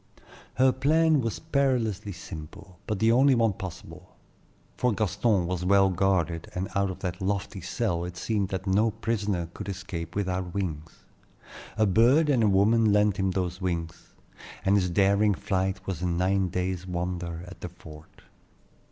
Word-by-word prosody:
Her 130 0 +4
plan 155 +3 +3
was 115 -2 -2
perilously 125 - 0
simple, 90 +1 -10
but 105 - -1
the 110 +3 +3
only 130 +3 +5
one 115 -3 +2
possible; 95 -2 -9 0.6
for 125 -2 +1
Gaston 100 -1 +1
was 90 0 -3
well 95 +1 +4
guarded, 85 -3 0
and 90 +1 -3
out 100 0 +1
of 95 - -7
that 90 0 -4
lofty 100 0 -2
cell 90 -1 -2
it 90 0 -6
seemed 100 0 -1
that 95 0 -4
no 105 +4 +3
prisoner 105 -5 -2
could 100 -1 -7
escape 90 -3 -6
without 95 -2 -2
wings. 80 -5 -5 0.7
A 110 - +4
bird 120 - +4
and 130 -5 +3
a 110 - +4
woman 105 +3 +4
lent 105 -1 +3
him 95 -1 +1
those 90 0 -2
wings, 85 -3 -4 0.5
and 95 +1 +4
his 90 -3 +2
daring 100 +2 +3
flight 95 0 -2
was 90 -4 -4
a 90 - 0
nine 90 +2 +1
days' 90 +1 -3
wonder 85 -1 -4
at 90 +2 -12
the 90 - -5
fort. 80 -3 -15
95 Hz, 160 wpm, -27 LUFS, 90-105 Hz, 0.7 s, only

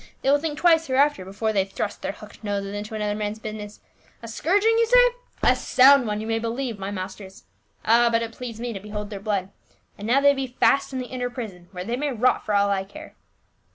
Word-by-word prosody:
They 270 - +3
will 290 - +4
think 300 -1 -3
twice 330 -1 +4
hereafter 275 -5 +2
before 205 +4 -2
they 195 -2 +2
thrust 195 +1 -5
their - - -2
hooked 215 +1 -14
noses 200 -1 -3
into 210 +1 -5
another 210 -1 -1
man's 210 0 -3
business. 215 -1 -8 0.4
A - - -7
scourg 350 - +1
ing, 450 +1 +4
you 460 - +3
say? - - +6 0.4
A - - +5
sound 265 -1 +5
one, 210 0 -2
you 215 - -5
may 225 0 -1
believe, 230 -1 -3
my 195 0 -4
masters. 190 0 -7 0.4
Ah, 235 +2 +5
but 230 0 +2
it 230 - -5
pleased 230 -1 -8
me 240 0 -4
to 195 - -6
behold 210 +1 -6
their 200 - -5
blood! 200 -2 -2 0.5
and 205 - -5
now 250 +4 +4
they 285 0 +5
be 270 -1 -3
fast 275 0 +3
in 265 - -4
the 255 - -3
inner 250 0 -4
prison 210 -8 -8
where 180 -2 -6
they 235 +3 -2
may 290 +1 -1
rot 250 +1 +1
for 210 - -1
all 200 0 +3
I 195 -1 0
care." 310 +11 -12
225 Hz, 235 wpm, -24 LUFS, 205-260 Hz, 0.5 s, say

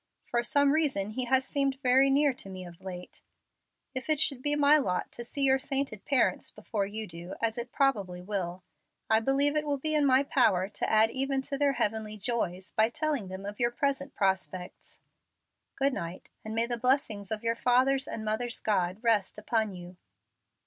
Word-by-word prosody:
For 240 0 -1
some 285 +3 +3
reason 275 -10 0
he 250 +3 -3
has 265 +1 +2
seemed 275 -2 0
very 265 +2 +5
near 280 0 +3
me 185 -1 -8
of 175 +1 -13
late. 180 -1 -8 0.7
If 260 +3 -4
it 310 -2 +4
should 275 -3 +2
be 290 +2 +2
my 295 +1 +5
lot 180 -10 -2
to 240 - -7
see 280 +4 -3
your 265 0 +4
sainted 270 -6 -2
parents 235 -10 +1
before 210 -1 -3
you 215 +2 -4
do, 175 0 -7
as 225 -1 0
it 240 +1 -6
probably 205 -10 0
will, 180 -2 -4 0.5
I 220 - +6
believe 275 +5 +1
it 305 - +1
will 290 -1 -1
be 310 +3 -2
in 295 -2 +3
my 260 +1 +4
power 205 -10 +2
to 210 - -2
add 220 +1 +4
even 270 0 -1
to 275 - -4
their 285 -1 +3
heavenly 220 -3 -1
joys 190 -4 -3
by 220 +1 +3
telling 285 -5 -1
them 190 +1 -7
of 205 +1 -7
your 240 -1 +2
present 275 +1 -2
prospects. 190 -2 -2 0.7
Good 275 0 +1
night, 170 -2 -6
and 220 0 -5
may 230 +1 +3
the 240 0 -2
blessing 250 -4 +1
of 220 0 -2
your 230 0 +1
father's 260 +3 +2
and 220 - -5
mother's 235 +3 -1
God 190 0 -1
rest 215 -5 +1
upon 220 0 0
you." 180 -1 -10
235 Hz, 190 wpm, -29 LUFS, 200-275 Hz, 0.7 s, I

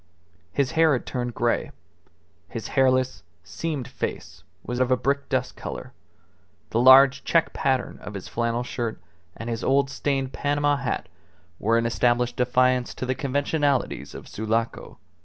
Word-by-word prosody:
His 140 - 0
hair 160 -1 +4
had 125 - -1
turned 120 -1 -3
grey, 120 0 0 0.8
his 115 - -6
hairless, 130 -4 +2 0.2
seamed 145 - -4
face - - -5 0.2
was 125 0 -4
of 130 -1 +2
a 130 - +3
brick 140 +2 -1
dust 130 -2 -1
colour; - - -7 0.8
the 115 - +1
large 135 +2 +7
check 165 -1 +2
pattern 130 -2 -1
of 100 - -8
his 95 - -6
flannel 115 +1 -1
shirt 120 -4 -4 0.4
and 115 - -6
his 115 -1 -3
old 135 0 +2
stained 135 -1 -1
Panama 145 0 +1
hat 135 -2 -3 0.5
were 115 +3 +2
an 115 - +1
established 120 +1 +1
defiance 125 0 +2
to - - -4
the 130 - 0
conventionalities 140 +1 -1
of - - -9
Sulaco. 110 +2 -2
130 Hz, 150 wpm, -25 LUFS, 120-140 Hz, 0.8 s, large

